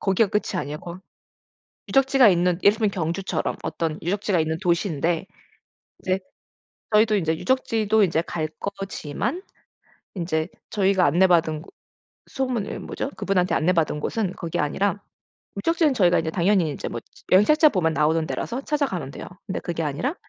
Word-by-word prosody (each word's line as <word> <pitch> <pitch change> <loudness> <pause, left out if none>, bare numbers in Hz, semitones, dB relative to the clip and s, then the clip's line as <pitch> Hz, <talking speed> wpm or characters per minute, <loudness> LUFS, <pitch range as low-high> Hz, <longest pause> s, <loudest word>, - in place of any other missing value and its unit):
거기가 195 +2 +2
끝이 210 0 -1
아니에요. 145 +1 -5
거 175 +1 -8 0.9
유적지가 270 -2 +5
있는 180 -2 +2
예를 200 +1 +6
들면 215 -2 +1
경주처럼 180 +1 -2
어떤 160 -2 -2
유적지가 200 +2 0
있는 160 0 -1
도시인데 170 -1 0 0.7
이제 185 0 0 0.7
저희도 215 0 +4
이제 160 -4 0
유적지도 220 -2 +1
이제 165 -3 +1
갈 160 -2 -3
거지만 200 - -4 0.8
인제 165 -2 -1 0.2
저희가 190 -2 +2
안내받은 165 -1 +3 0.6
소문이 255 -6 -3
뭐죠? 275 - -4
그분한테 185 -2 +1
안내받은 160 -3 +1
곳은 200 +2 -1
그게 170 -2 -4
아니라 200 +7 0 0.6
유적지는 320 - +2
저희가 180 -7 +4
이제 160 -1 -3
당연히 180 0 +2
인제 - - -5
뭐 115 - -5 0.3
여행 190 +3 +7
책자 305 +4 +5
보면 180 - +1
나오는 160 +1 +2
데라서 245 +3 -3
찾아가면 275 - -2
돼요. - - -8 0.2
근데 195 - -3
그게 170 -2 -3
아니라 160 - -2
185 Hz, 360 characters per minute, -24 LUFS, 160-210 Hz, 0.9 s, 여행